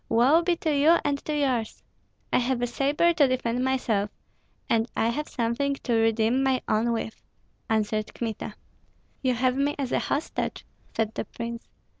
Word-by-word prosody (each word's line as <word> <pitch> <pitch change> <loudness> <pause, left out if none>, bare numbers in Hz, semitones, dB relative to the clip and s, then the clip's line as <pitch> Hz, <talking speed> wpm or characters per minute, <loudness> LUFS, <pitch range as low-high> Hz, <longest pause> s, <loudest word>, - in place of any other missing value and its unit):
Woe 255 +9 +5
be 345 0 +1
to 315 -2 -1
you 310 +4 +6
and 285 -1 +1
to 305 -1 -1
yours!" 255 -6 -1 0.5
"I - - +5
have 250 0 0
a - - +4
sabre 285 +7 +2
to 300 -5 +4
defend 250 -1 0
myself, 235 -6 +1 0.6
and 230 +1 +1
I 225 - +2
have 300 +6 -2
something 250 +4 0
to 245 - -3
redeem 225 +2 +3
my 265 -1 +2
own 225 +2 +2
with," 225 -1 -3 0.5
answered 215 -1 0
Kmita. 220 -2 -4 0.7
"You 255 -2 +1
have 250 +1 +2
me 280 +2 +1
as 270 -3 -3
a - - +2
hostage," 295 +3 -2 0.3
said 220 -1 -1
the - - -3
prince. 235 0 -6
250 Hz, 170 wpm, -26 LUFS, 225-280 Hz, 0.7 s, you